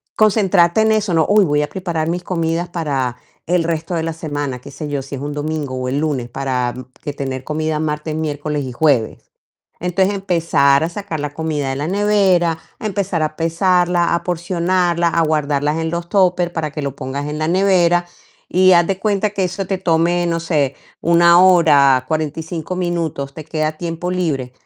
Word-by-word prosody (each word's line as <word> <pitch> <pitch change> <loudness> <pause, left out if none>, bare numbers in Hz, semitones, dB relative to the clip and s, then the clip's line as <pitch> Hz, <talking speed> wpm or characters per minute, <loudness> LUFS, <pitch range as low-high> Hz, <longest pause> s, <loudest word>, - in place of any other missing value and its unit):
concentrarte 195 -3 +3
en 220 0 +3
eso, 210 -4 0
¿no? 160 -1 +3
"Uy, 205 -2 +5
voy 150 -1 +1
a 150 - -2
preparar 170 -4 -3
mis 175 +1 -2
comidas 170 0 -2
para 135 -8 -2 0.3
el 175 0 +1
resto 165 +1 -3
de 165 - 0
la 165 0 -2
semana", 145 -5 -4
qué 140 - -12
sé 150 +2 -6
yo, 140 -1 -2
si 140 - -11
es 135 - -7
un 145 0 -4
domingo 150 -3 -3
o 130 0 -3
el 140 +2 -1
lunes, 140 -6 -1
para 125 -2 -2 0.3
que 145 - -4
tener 135 -2 -4
comida 155 +1 -2
martes, 150 0 -3
miércoles 150 -1 -2
y 130 - -5
jueves, 130 -6 0 0.5
entonces, 190 +3 +1
empezar 165 -7 +2
a - - 0
sacar 175 -4 -5
la 145 0 -4
comida 155 -4 -2
de 135 - -2
la 150 +3 -3
nevera, 190 -5 +2 0.2
empezar 195 -6 -2
a 155 0 -2
pesarla, 175 +1 +2
a 170 - -1
porcionarla, 175 0 0
a 165 - +1
guardarlas 150 -1 0
en 160 0 -2
los 170 0 -4
tóper 180 -3 +2
para 155 -2 -2
que 150 - -5
lo 140 -1 -4
pongas 140 +2 -4
en 150 +1 -4
la 155 +1 -1
nevera 175 -2 +3 0.4
y 185 +1 +4
haz 170 -1 +5
de 195 -1 -1
cuenta 205 0 0
que 195 -2 -1
eso 185 +1 -3
te 195 - -1
tome, 175 +1 +1
no 165 -1 -1
sé, 150 -5 0 0.3
1 170 +1 +5
hora, 145 -8 +5
45 160 +3 -3
minutos, 165 -6 -2
te 155 - -8
queda 155 0 -1
tiempo 170 +1 -4
libre, 145 -9 -2
165 Hz, 190 wpm, -18 LUFS, 145-180 Hz, 0.5 s, Uy